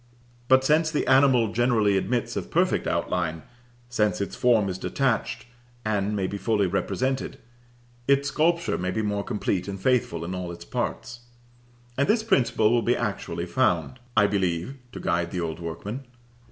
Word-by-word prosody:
But 130 +1 +5
since 155 +3 +3
the 150 - -1
animal 130 -5 +4
generally 115 -4 +3
admits 120 +5 -1
of - - -4
perfect - - +1
outline 80 -3 -1 0.4
since 105 -6 0
its 100 - -3
form 115 -5 +3
is 95 -1 -4
detached, 120 -1 -1 0.4
and 105 -1 0
may 95 -2 0
be 100 +2 -4
fully 105 +1 +1
represented, 130 +8 -1 0.7
its 140 +1 +3
sculpture 170 +4 +1
may 90 +1 -1
be 110 +4 -1
more 105 -1 -1
complete 95 -3 -2
and 100 -1 -5
faithful 95 -8 +1
in 90 - -4
all 90 -1 -4
its 85 - -10
parts. 120 - -4 0.8
And 140 - +3
this 220 +1 +2
principle 125 - +2
will 120 0 +3
be 120 +2 +1
actually 105 -4 -3
found. 130 - 0 0.2
I 105 - +6
believe, 95 +3 -1 0.2
to - - -8
guide 85 0 0
the 90 - -3
old 80 0 -4
workmen. 100 +10 -5
105 Hz, 165 wpm, -25 LUFS, 95-130 Hz, 0.8 s, I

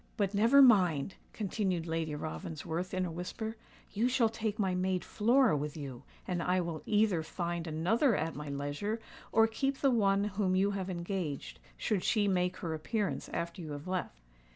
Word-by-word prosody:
"But 200 -2 0
never 230 +7 +6
mind," 185 - +4 0.2
continued 190 -4 -1
Lady 160 -2 -2
Ravensworth, 145 - -4
in 185 -1 0
a 175 - -4
whisper; 220 +6 -5 0.4
"you 225 +5 +2
shall 250 -3 +3
take 220 -1 -3
my 190 -4 +1
maid 180 -1 0
Flora 240 - +3
with 150 +1 -3
you, 135 -5 -6 0.3
and 180 -2 -1
I 180 +2 +2
will 170 -3 -3
either 210 -5 +3
find 170 +1 -3
another 195 - +2
at 165 -2 -1
my 150 +1 -6
leisure, 145 +11 -3 0.3
or 225 0 +6
keep 270 +5 -1
the 275 -1 +3
one 200 -4 +3
whom 200 -2 0
you 195 +2 +3
have 195 -2 -3
engaged, 170 -4 -4 0.2
should 205 -5 0
she 210 -3 +2
make 180 -1 +1
her 165 -2 -3
appearance 200 +6 -2
after 170 +2 -4
you 155 -3 -6
have 145 +4 -7
left." 185 -1 -3
185 Hz, 175 wpm, -32 LUFS, 165-215 Hz, 0.4 s, never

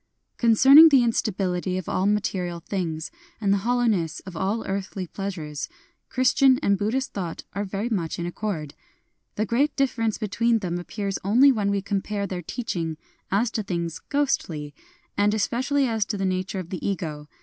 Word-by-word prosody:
Concerning 265 +7 +8
the 270 -4 +5
instability 185 -5 0
of 185 - -5
all 185 +2 0
material 185 -4 -1
things, 165 -3 -4 0.3
and 200 -2 +2
the 200 - +2
hollowness 220 -8 +1
of 190 -2 -10
all 195 +6 -1
earthly 195 -1 -3
pleasures, 165 -7 -5 0.4
Christian 260 +1 +4
and 200 - +3
Buddhist 225 +7 -1
thought 175 -5 -4
are 200 - -2
very 200 +3 -3
much 185 -9 -2
in 170 - -3
ac 175 - -3
cord. 165 -9 -4 0.6
The 215 - 0
great 260 +8 +1
difference 230 -5 0
between 230 +2 +1
them 175 -4 -3
ap 175 - -9
pears 200 -2 -3
only 245 +8 +6
when 210 -5 0
we 200 -1 0
compare 200 0 -2
their 185 -2 -4
teaching 165 -5 -4 0.3
as 220 +4 +1
to 220 - -1
things 170 -4 -3
ghostly, 165 - -1 0.2
— - - -37
and 205 +1 +3
especially 260 +7 +1
as 225 -2 +1
to 210 - -3
the 195 - -1
nature 185 +1 -2
of 180 -3 -6
the 185 - -5
Ego. 155 -6 -3
200 Hz, 175 wpm, -25 LUFS, 180-230 Hz, 0.6 s, Concerning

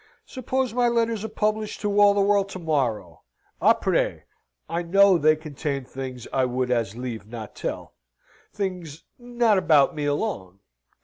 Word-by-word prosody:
"Suppose 260 -2 -2
my 245 0 +2
letters 230 -2 0
are - - -2
published 215 0 -2
to 205 0 0
all 205 0 +6
the 200 - +2
world 200 0 +2
to 190 - -7
morrow? 125 - -2 0.4
Apres? - - +2 0.4
I 170 +2 -2
know 190 +1 +4
they 155 0 +4
contain 145 -3 -5
things 130 -2 -7
I 130 - +2
would 125 0 -1
as 115 -4 0
lieve 120 -5 -6
not 110 -2 -8
tell. - - -5 0.6
Things 180 -6 -5 0.2
not 240 -4 +2
about 150 -5 +4
me 150 -1 -3
alone. 145 - -3
165 Hz, 150 wpm, -24 LUFS, 130-210 Hz, 0.6 s, all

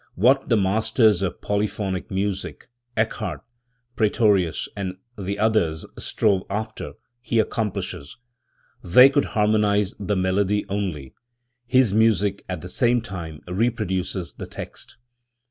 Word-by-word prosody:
What 130 +8 +3
the 115 - +4
masters 110 +1 +3
of 95 -3 -3
polyphonic 100 -3 -2
music, 95 +4 -3 0.3
Eccard, 110 -6 -1 0.5
Praetorius 105 -6 +2
and 95 -3 -4 0.2
the 100 0 -4
others 105 -8 +1
strove 100 -4 +1
after, 105 +2 -4 0.3
he 115 -1 -1
accomplishes. 105 -7 -2 0.7
They 125 +10 +8
could 140 0 +2
harmonise 105 -1 +2
the 105 0 -1
melody 95 +2 +1
only; 90 -10 -3 0.5
his 125 -4 +3
music 105 -2 +2
at 90 -4 -4
the 90 - -7
same 120 +2 +2
time 85 -8 -7
reproduces 95 -3 -1
the - - -8
text. - - -9
100 Hz, 115 wpm, -23 LUFS, 95-110 Hz, 0.7 s, They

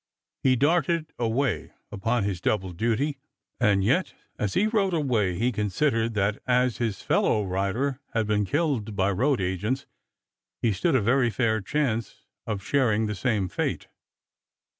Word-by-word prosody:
He 130 -1 +4
darted 160 +3 +1
away 115 - -1 0.2
upon 115 +3 0
his 95 -3 -2
double 95 -3 0
duty 120 - -1 0.4
and 100 -5 +3
yet 135 - +1 0.2
as 105 -2 -1
he 205 - +3
rode 205 -5 +1
away 115 - +1
he 120 +5 +1
considered 115 +2 0
that 100 0 0
as 125 -1 +2
his 115 -4 -2
fellow 105 - +2
rider 100 +9 -1 0.2
had 110 -1 +2
been 105 0 +1
killed 130 - -1
by 95 +1 +2
road 130 +7 +1
agents, 100 +9 -1 0.7
he 115 -3 +1
stood 155 - +1
a 130 - +3
very 120 +2 +3
fair 110 -2 0
chance 115 0 -2 0.2
of 105 -3 -3
sharing 110 -5 +2
the 105 - -2
same 105 -1 0
fate. - - -3
115 Hz, 150 wpm, -26 LUFS, 100-135 Hz, 0.7 s, He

